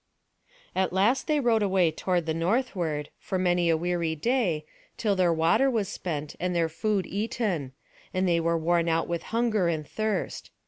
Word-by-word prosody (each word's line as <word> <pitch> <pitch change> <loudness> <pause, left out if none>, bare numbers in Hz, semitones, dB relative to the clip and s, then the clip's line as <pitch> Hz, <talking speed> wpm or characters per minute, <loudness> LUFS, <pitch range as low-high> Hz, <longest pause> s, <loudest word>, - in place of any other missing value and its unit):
At 190 0 +1
last 215 +9 +2
they 305 -2 +2
rowed 235 -4 +2
away 190 -4 +3
toward 175 +1 -1
the 160 - -1
northward, 170 - -1
for 190 - -3
many 175 -2 +2
a 165 - +3
weary 170 -1 -1
day, 180 - 0 0.3
till 210 -3 +1
their 180 -2 +3
water 170 +12 +3
was 220 -6 0
spent, 150 -7 -4
and 180 0 -1
their 165 -1 +2
food 200 +3 -1
eaten; 200 - -2 0.4
and 185 0 0
they 170 -1 +3
were 165 0 +1
worn 170 +1 +1
out 165 0 +1
with 170 -1 -2
hunger 225 -5 +1
and 155 -3 -2
thirst. 215 -1 -3
180 Hz, 175 wpm, -27 LUFS, 165-215 Hz, 0.4 s, away